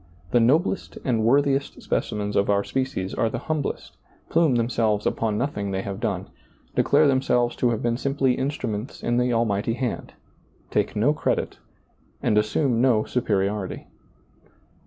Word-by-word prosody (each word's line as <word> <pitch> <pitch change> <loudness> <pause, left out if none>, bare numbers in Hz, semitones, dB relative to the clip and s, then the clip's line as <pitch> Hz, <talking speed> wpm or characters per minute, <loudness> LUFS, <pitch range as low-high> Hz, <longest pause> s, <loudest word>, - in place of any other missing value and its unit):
The 120 - +4
noblest 155 +11 +1
and 115 -4 +1
worthiest 140 +3 +2
specimens 105 -1 -2
of 100 - +2
our 100 0 +3
species 130 -8 -2
are 115 - +1
the - - -3
hum 155 -2 -2
blest, - - -5 0.3
plume 160 -6 +3
themselves 115 -3 +1
upon 110 -2 0
nothing 105 -6 -2
they 95 0 -2
have 100 -1 -5
done, - - -2 0.5
declare 150 +2 +4
themselves 125 -3 +2
to 125 - +2
have 115 -2 -2
been 120 0 +1
simply 135 -1 +1
instruments 125 -4 -3
in 120 0 +1
the 125 0 +2
Almighty 115 -2 +1
Hand, 125 -2 -4 0.6
take - - 0
no 120 +8 +3
credit, - - -1 0.6
and - - +1
assume 115 +3 +2
no 120 -4 +4
superiority. 100 -4 -1
120 Hz, 150 wpm, -24 LUFS, 105-135 Hz, 0.6 s, The